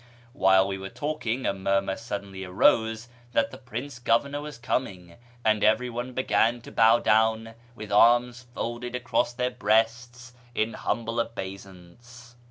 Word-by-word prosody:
Wliile 95 0 +4
we 95 -1 -4
were 95 0 -7
talking, 140 -4 -3
a - - +1
murmur 95 0 0
suddenly 100 -4 -6
arose 110 +5 +2 0.3
that 115 - +1
the 130 - -9
Prince 125 +1 -7
Governor 140 +5 +1
was 150 -3 -8
coming, 95 -8 -3 0.3
and 110 -1 +2
everyone 120 +3 +1
began 120 -2 +1
to - - -12
bow 115 +1 +5
down, 110 0 +2 0.2
with 105 -2 -9
arms 120 +3 +4
folded 120 +1 -4
across 125 -1 0
their 125 0 -2
breasts, 120 +2 0 0.2
in 110 +1 0
humljle 115 0 -2
obeisance. 105 +3 -10
115 Hz, 140 wpm, -26 LUFS, 100-125 Hz, 0.3 s, bow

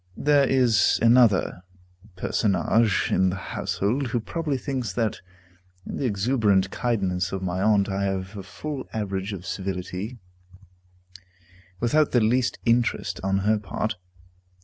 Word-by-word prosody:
There 145 -2 +3
is 125 -5 +3
another 115 -6 +4 0.5
personage 105 +3 +1
in 95 0 +3
the 90 - -2
household, 110 - -2
who 120 +1 -1
probably 150 +4 -2
thinks 130 -3 -3
that 115 -3 -1 0.6
in - - -5
the - - -2
exuberant 100 -3 +2
kindness 95 -7 -1
of 95 -1 -4
my 90 0 -2
aunt 105 -1 +3
I 100 0 -1
have 95 +1 -3
a 100 - -5
full 135 +8 -7
average 100 -2 -3
of 95 -3 -7
civility, 95 +4 -4 1.6
without 145 +7 +2
the 125 - +5
least 120 +3 +1
interest 120 0 +1
on 95 0 +1
her 110 0 +3
part. 105 +2 -3
110 Hz, 130 wpm, -25 LUFS, 95-125 Hz, 1.6 s, the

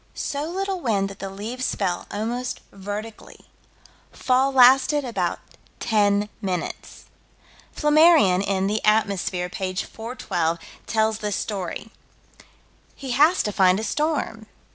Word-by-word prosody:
So 285 +1 -3
little 380 +3 -3
wind 205 - 0
that 195 - -13
the 195 - -5
leaves 225 +7 -4
fell 180 -3 -2
almost 240 +4 -3
vertically. 205 +3 -8 0.7
Fall 260 +1 +1
lasted 270 +3 +5
about 240 -1 -2 0.4
ten 205 -2 +2
minutes. 180 -4 -5 0.7
Flammarion, 300 - +5
in 195 -1 0
The 210 +2 -1
Atmosphere, 200 -4 +1
p. 185 0 -4
412, 195 -6 -3 0.3
tells 220 -1 +1
this 210 -2 -2
story. 200 +1 -4 1.0
He 270 -2 -6
has 300 +8 +4
to 210 - -2
find 190 -2 +3
a - - -4
storm. 280 -4 -2
220 Hz, 120 wpm, -23 LUFS, 195-255 Hz, 1.0 s, lasted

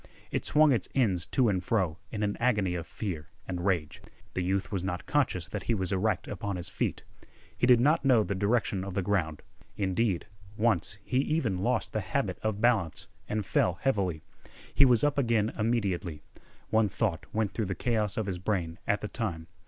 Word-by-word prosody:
It - - -1
swung 155 0 +5
its 115 -8 0
ends 95 -10 +2
to 130 -3 +2
and 95 -3 +1
fro 90 -6 0
in 105 -1 -2
an 100 0 0
agony 105 -7 +2
of 85 -2 -4
fear 85 -8 -5 0.2
and 90 -2 -3
rage. 90 -6 0 0.3
The 95 - -1
youth 95 +1 -1
was 95 -3 -1
not 90 -2 -3
conscious 120 - +1
that - - -5
he 115 - +4
was 95 -2 -1
erect 95 0 0
upon 100 -3 -3
his 90 -1 -5
feet. - - -2 0.5
He 120 - +1
did 125 -2 +7
not 150 +7 +3
know 125 -5 +5
the 100 - -2
direction 100 -1 +1
of 95 -1 -6
the 100 - 0
ground. 85 -6 -1 0.3
Indeed, 95 -1 0 0.3
once 100 -4 +1
he 125 - -1
even 135 - 0
lost 115 0 0
the 110 - 0
habit 100 -2 -2
of 110 -2 -1
balance 110 -9 +1 0.2
and 105 -1 -1
fell 90 -1 +2
heavily. 95 - 0 0.5
He 140 - +7
was 120 -4 +4
up 145 0 +2
again 115 -4 +2
immediately. 100 -9 -1 0.5
One 110 -1 +3
thought - - -1
went 110 -2 0
through 110 - -2
the 95 0 -3
chaos 110 -2 0
of 110 - 0
his 95 -2 -3
brain 90 -4 -2
at 105 - +1
the 105 - -3
time. 95 -6 -3
100 Hz, 195 wpm, -29 LUFS, 90-115 Hz, 0.5 s, did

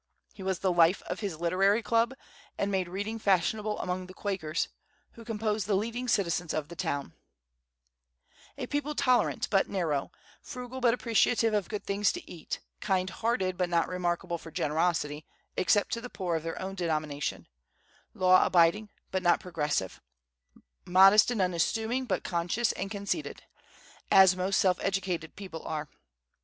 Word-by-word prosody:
He - - -12
was 190 -1 -1
the 185 +1 +1
life 170 +2 +4
of - - -5
his 195 -7 -4
literary 195 +6 +2
club, 230 +2 +1 0.4
and 200 - -1
made 185 -2 0
reading 205 +5 -4
fashionable 210 +2 +1
among 180 0 -3
the 185 - -12
Quakers, 180 -6 -2 0.4
who 230 - -13
composed 215 -3 -2
the 205 - +2
leading 230 +5 -2
citizens 175 -6 0
of 150 -1 -3
the 170 - -9
town, 140 - -3 1.4
a - - -3
people 290 +1 -2
tolerant 255 -3 +2
but 195 -2 +3
narrow, 160 -8 -1 0.3
frugal 250 0 -7
but 240 -1 +4
appreciative 230 -1 +2
of 205 -4 0
things 205 -1 0
good 355 - -5
to - - -24
eat, 165 -3 -6 0.2
kind 190 -2 0
hearted 190 -4 -1
but 180 -1 +1
not 170 -1 +2
remarkable 175 -1 -2
for 165 - -10
generosity, 155 -1 0 0.3
except 205 +3 +2
to 230 - -2
the 245 - -7
poor 180 -6 -2
of 160 - -1
their 165 +1 -5
own 190 +1 -4
denomination, 155 -5 -2 0.7
law 185 0 +5
abiding 180 +4 +3 0.2
but 190 - 0
not 175 -1 +3
progressive, 150 - -2 0.8
modest 195 +5 +6
and 225 -6 +1
unassuming 220 +8 0
but 215 - -1
conscious 180 +6 0
and 195 +1 -4
conceited, 200 +9 -4 0.7
as 190 -1 +7
most 185 +1 0
self 185 -2 +3
educated 190 -4 -2
people 185 -5 -8
are. 155 -1 -4
190 Hz, 155 wpm, -29 LUFS, 170-215 Hz, 1.4 s, as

